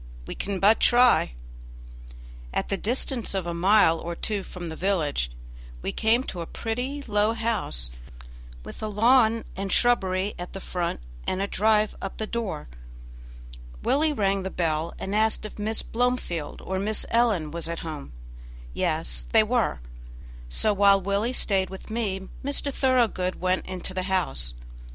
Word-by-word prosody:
We -, -, -5 dB
can 195 Hz, -1 st, -3 dB
but 210 Hz, +4 st, +5 dB
try." 245 Hz, -, +5 dB, 1.2 s
At -, -, -2 dB
the 195 Hz, -, +1 dB
distance 235 Hz, 0 st, -1 dB
of 190 Hz, -3 st, -1 dB
a 170 Hz, -, -2 dB
mile 175 Hz, -1 st, +4 dB
or 170 Hz, 0 st, -5 dB
two 205 Hz, +3 st, -2 dB
from 180 Hz, -2 st, -7 dB
the 160 Hz, -, -6 dB
village 160 Hz, -, 0 dB, 0.5 s
we -, -, -1 dB
came 230 Hz, +3 st, +2 dB
to 180 Hz, -9 st, -5 dB
a 165 Hz, -, -5 dB
pretty, 250 Hz, +5 st, -3 dB
low 210 Hz, -2 st, +2 dB
house, 220 Hz, -, -2 dB, 0.7 s
with -, -, -9 dB
a 215 Hz, -, -2 dB
lawn 225 Hz, +1 st, +4 dB
and 195 Hz, 0 st, -3 dB
shrubbery 195 Hz, -5 st, +2 dB
at 175 Hz, -, -6 dB
the 195 Hz, -, -5 dB
front 175 Hz, -, -3 dB, 0.3 s
and 185 Hz, -, 0 dB
a 195 Hz, -, +1 dB
drive 215 Hz, +1 st, +2 dB
up 195 Hz, -, -4 dB
to 220 Hz, -, -2 dB
the -, -, -15 dB
door. 220 Hz, -, -3 dB, 1.2 s
Willie 305 Hz, +2 st, +2 dB
rang 200 Hz, -7 st, +1 dB
the 190 Hz, -, -3 dB
bell, 165 Hz, -2 st, -1 dB
and 195 Hz, -, -4 dB
asked 220 Hz, +1 st, +2 dB
if 215 Hz, -, -8 dB
Miss 220 Hz, +2 st, -1 dB
Blomefield 230 Hz, -10 st, -2 dB
or 190 Hz, 0 st, -2 dB
Miss 210 Hz, +2 st, 0 dB
Ellen 220 Hz, -10 st, +2 dB
was 165 Hz, 0 st, -2 dB
at 170 Hz, -, -4 dB
home. 155 Hz, -, -6 dB, 0.6 s
Yes, -, -, -1 dB
they -, -, +6 dB
were. -, -, 0 dB, 0.7 s
So, 210 Hz, -, +2 dB
while 200 Hz, 0 st, +5 dB
Willie 200 Hz, +5 st, 0 dB
stayed 195 Hz, -6 st, +2 dB
with 190 Hz, +3 st, -9 dB
me, 195 Hz, -4 st, -2 dB, 0.2 s
Mr. 280 Hz, 0 st, 0 dB
Thoroughgood 240 Hz, -9 st, +2 dB
went 185 Hz, 0 st, 0 dB
into 185 Hz, 0 st, -4 dB
the 185 Hz, -, -1 dB
house. 65 Hz, -, 0 dB
200 Hz, 160 wpm, -26 LUFS, 180-225 Hz, 1.2 s, they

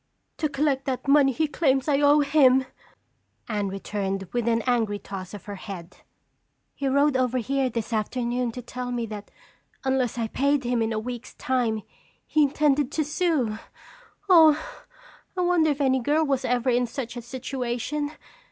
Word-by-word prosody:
"To 305 Hz, -, 0 dB
collect 275 Hz, -1 st, 0 dB
that 265 Hz, 0 st, -3 dB
money 280 Hz, -1 st, +5 dB
he 310 Hz, +5 st, 0 dB
claims 270 Hz, -3 st, +1 dB
I 285 Hz, -1 st, +2 dB
owe 290 Hz, +1 st, +5 dB
him," 270 Hz, -3 st, +4 dB, 0.8 s
Anne 210 Hz, -3 st, -1 dB
returned 195 Hz, 0 st, -3 dB
with 240 Hz, -1 st, -1 dB
an 230 Hz, -1 st, +2 dB
angry 230 Hz, -5 st, +1 dB
toss 195 Hz, -1 st, -8 dB
of 205 Hz, -, -11 dB
her 205 Hz, -1 st, -6 dB
head. 185 Hz, -3 st, -9 dB, 0.8 s
"He 275 Hz, -, -3 dB
rowed 280 Hz, +1 st, +3 dB
over 255 Hz, -1 st, +1 dB
here 265 Hz, +2 st, 0 dB
this 230 Hz, 0 st, -4 dB
afternoon 240 Hz, +2 st, -1 dB
to 250 Hz, -, -7 dB
tell 250 Hz, +1 st, -5 dB
me 240 Hz, -1 st, -2 dB
that 210 Hz, -2 st, -8 dB, 0.5 s
unless 260 Hz, -3 st, 0 dB
I 230 Hz, -1 st, -1 dB
paid 280 Hz, +4 st, +1 dB
him 240 Hz, -1 st, 0 dB
in 225 Hz, 0 st, 0 dB
a 220 Hz, -, -1 dB
week's 240 Hz, +2 st, -6 dB
time 235 Hz, -5 st, -1 dB, 0.4 s
he 310 Hz, -, +2 dB
intended 290 Hz, -1 st, +2 dB
to 310 Hz, -, 0 dB
sue! 290 Hz, -, 0 dB, 0.7 s
Oh, 320 Hz, -5 st, +7 dB, 0.8 s
I -, -, +1 dB
wonder 350 Hz, -3 st, +3 dB
if 290 Hz, -1 st, -1 dB
any 265 Hz, -2 st, +3 dB
girl 295 Hz, +5 st, +2 dB
was 270 Hz, -2 st, 0 dB
ever 250 Hz, +1 st, +1 dB
in 245 Hz, 0 st, +2 dB
such 235 Hz, -1 st, -5 dB
a 240 Hz, -, -5 dB
situation? 260 Hz, +3 st, -3 dB
255 Hz, 170 wpm, -25 LUFS, 230-285 Hz, 0.8 s, Oh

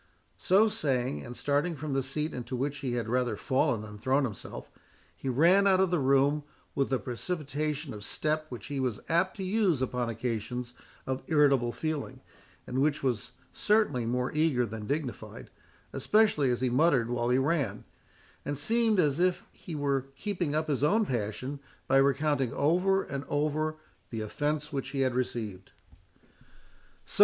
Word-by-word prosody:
So 200 Hz, +4 st, +5 dB
saying, 130 Hz, -, -1 dB
and 120 Hz, -, -8 dB
starting 145 Hz, +4 st, 0 dB
from 150 Hz, -1 st, -4 dB
the 135 Hz, -, +2 dB
seat 150 Hz, +4 st, -3 dB
into 125 Hz, 0 st, -4 dB
which 140 Hz, +3 st, -2 dB
he 130 Hz, -4 st, -2 dB
had 120 Hz, -2 st, -2 dB
rather 125 Hz, -1 st, +1 dB
fallen 130 Hz, -2 st, +1 dB
than 105 Hz, -1 st, -9 dB
thrown 135 Hz, +5 st, +2 dB
himself, 110 Hz, -7 st, -6 dB, 0.5 s
he 135 Hz, -, -4 dB
ran 175 Hz, +10 st, +5 dB
out 190 Hz, -1 st, +5 dB
of 190 Hz, -2 st, +3 dB
the 175 Hz, -, +2 dB
room 140 Hz, +2 st, +3 dB, 0.3 s
with 135 Hz, -1 st, 0 dB
a 130 Hz, -, +3 dB
precipitation 150 Hz, +2 st, -3 dB
of 105 Hz, -1 st, -8 dB
step 155 Hz, +5 st, -1 dB
which 120 Hz, -5 st, -7 dB
he 140 Hz, -1 st, -4 dB
was 125 Hz, -5 st, -1 dB
apt 180 Hz, +5 st, +2 dB
to 195 Hz, -, -4 dB
use 190 Hz, -, +2 dB
upon 125 Hz, -2 st, -1 dB
occasions 120 Hz, +1 st, -3 dB, 0.3 s
of 130 Hz, 0 st, -2 dB
irritable 140 Hz, -6 st, +4 dB
feeling, 155 Hz, +2 st, -4 dB, 0.4 s
and 130 Hz, +2 st, -1 dB
which 150 Hz, 0 st, +1 dB
was 125 Hz, -6 st, -1 dB, 0.2 s
certainly 175 Hz, -, +2 dB
more 125 Hz, +1 st, 0 dB
eager 150 Hz, -5 st, +2 dB
than 110 Hz, -2 st, -6 dB
dignified, 145 Hz, -3 st, -4 dB, 0.4 s
especially 210 Hz, -11 st, +3 dB
as 120 Hz, 0 st, 0 dB
he 130 Hz, -, +2 dB
muttered 130 Hz, -3 st, +3 dB
while 120 Hz, 0 st, 0 dB
he 125 Hz, -, +4 dB
ran, 145 Hz, +2 st, 0 dB, 0.6 s
and 145 Hz, -1 st, -3 dB
seemed 220 Hz, -, +2 dB
as 150 Hz, -3 st, +2 dB
if 180 Hz, 0 st, +1 dB
he 165 Hz, -, -8 dB
were 140 Hz, -2 st, 0 dB
keeping 175 Hz, -2 st, -2 dB
up 155 Hz, 0 st, 0 dB
his 140 Hz, -2 st, 0 dB
own 215 Hz, +9 st, +3 dB
passion, 125 Hz, -, -3 dB, 0.3 s
by 135 Hz, -, +4 dB
recounting 140 Hz, -1 st, +2 dB
over 180 Hz, +6 st, +2 dB
and 140 Hz, 0 st, -5 dB
over 155 Hz, +2 st, 0 dB, 0.3 s
the 115 Hz, -2 st, -4 dB
offence 150 Hz, +7 st, -2 dB
which 135 Hz, -1 st, -3 dB
he 135 Hz, -, -2 dB
had 130 Hz, -2 st, +2 dB
received. 110 Hz, -6 st, -3 dB, 1.3 s
"So!" -, -, -5 dB
140 Hz, 165 wpm, -29 LUFS, 125-155 Hz, 1.3 s, So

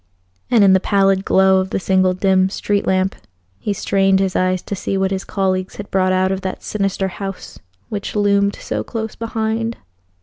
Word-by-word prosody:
And 230 Hz, -4 st, +5 dB
in 195 Hz, -1 st, +6 dB
the 190 Hz, -, +5 dB
pallid 195 Hz, -1 st, +2 dB
glow 190 Hz, 0 st, +4 dB
of 190 Hz, 0 st, -2 dB
the -, -, -1 dB
single 185 Hz, -1 st, +2 dB
dim 190 Hz, 0 st, +2 dB
street 205 Hz, +1 st, -1 dB
lamp 190 Hz, 0 st, +1 dB, 0.5 s
he 210 Hz, -, -2 dB
strained 195 Hz, -1 st, +2 dB
his 190 Hz, -1 st, 0 dB
eyes 185 Hz, 0 st, +1 dB
to 200 Hz, -, -4 dB
see 195 Hz, 0 st, -2 dB
what 190 Hz, 0 st, 0 dB
his 190 Hz, 0 st, -2 dB
colleagues 185 Hz, -1 st, -1 dB
had 205 Hz, -, -8 dB
brought 185 Hz, -1 st, +2 dB
out 185 Hz, 0 st, +2 dB
of 190 Hz, 0 st, -2 dB
that 190 Hz, 0 st, -5 dB
sinister 195 Hz, -2 st, -1 dB
house 195 Hz, +2 st, -7 dB, 0.3 s
which 205 Hz, 0 st, -5 dB
loomed 200 Hz, -1 st, +2 dB
so -, -, -4 dB
close 220 Hz, -2 st, -5 dB
behind. 225 Hz, 0 st, -2 dB
195 Hz, 190 wpm, -19 LUFS, 190-200 Hz, 0.5 s, in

